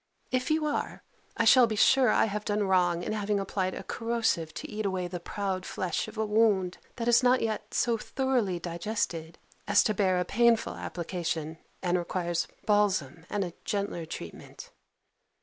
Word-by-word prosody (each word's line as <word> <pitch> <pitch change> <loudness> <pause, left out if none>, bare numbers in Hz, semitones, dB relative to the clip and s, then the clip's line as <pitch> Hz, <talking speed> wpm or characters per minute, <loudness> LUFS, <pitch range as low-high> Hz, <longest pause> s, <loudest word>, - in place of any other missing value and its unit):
If 255 +2 0
you 310 0 +2
are, 295 - -2 0.3
I 230 - +2
shall 250 +1 +7
be 220 - -2
sure 260 +4 +5
I - - +4
have 210 -1 -3
done 210 0 0
wrong 175 -2 +2
in - - -2
having 210 -1 0
applied 190 -1 -2
a - - -6
corrosive 225 -8 -1
to - - -6
eat 215 0 -4
away 190 -3 -1
the 175 0 -5
proud 190 +1 -3
flesh 185 0 -2
of 220 0 -10
a 220 - 0
wound, 210 -4 +2 0.2
that 235 -1 -4
is 240 +1 +5
not 250 0 +3
yet 220 -1 -3
so 235 -2 +2
thoroughly 250 -8 0
digested, 170 -1 -3 0.3
as - - +5
to 215 - +1
bear 185 -2 +2
a 180 - 0
painful 235 +3 +3
application, 165 -2 -4 0.2
and 180 0 +2
requires 175 -1 -2 0.2
balsam 190 -7 +1
and 205 -1 -1
a 175 - -7
gentler 200 -6 -3
treatment. 85 - -9
200 Hz, 175 wpm, -29 LUFS, 175-225 Hz, 0.3 s, shall